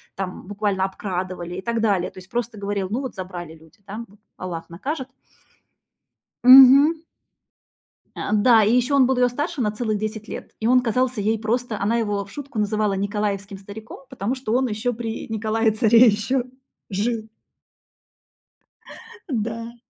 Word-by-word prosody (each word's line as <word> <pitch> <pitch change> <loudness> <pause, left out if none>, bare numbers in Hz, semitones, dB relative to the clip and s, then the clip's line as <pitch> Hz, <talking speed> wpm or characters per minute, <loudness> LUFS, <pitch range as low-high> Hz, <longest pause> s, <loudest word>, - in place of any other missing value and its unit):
там 185 -2 -5
буквально 205 -1 -1
обкрадывали 185 -2 -5
и 185 - -5
так 235 -1 -1
далее, 200 -5 +1
то - - -12
есть 185 +1 -15
просто 235 -2 -3
говорил: 200 -2 -2
"Ну 240 +5 -1
вот, 260 -5 -6
забрали 175 -3 -7
люди, 160 +5 -21
да, 220 +4 -6
вот 205 +2 -22 0.2
Аллах 175 -3 -6
накажет". 260 - -5 1.3
Мгм. 270 +5 +9 1.2
А, - - -3
да, 220 +1 +5
и 210 +3 +3
ещё 250 +3 +1
он 270 -2 +6
был 265 -1 +1
её 250 0 +4
старше 290 +4 -3
на 210 -3 +1
целых 215 0 -2
10 215 +1 -5
лет, - - -7
и 220 - +1
он 250 +1 +5
казался 250 +1 0
ей 220 +2 +1
просто 230 +1 -2
она 225 +4 +1
его 205 -3 -1
в 200 - -15
шутку 280 -5 -6
называла 210 -1 0
николаевским 200 0 -2
стариком, 205 +3 -10
потому 245 0 -3
что 255 -4 -4
он 255 +1 +2
ещё 215 +3 -2
при 225 -1 -5
Николае-царе 220 +1 +3
ещё 225 +5 +1 0.5
жил. 220 +3 -2 2.1
Да. 230 +1 -3
220 Hz, 155 wpm, -22 LUFS, 200-240 Hz, 2.1 s, Мгм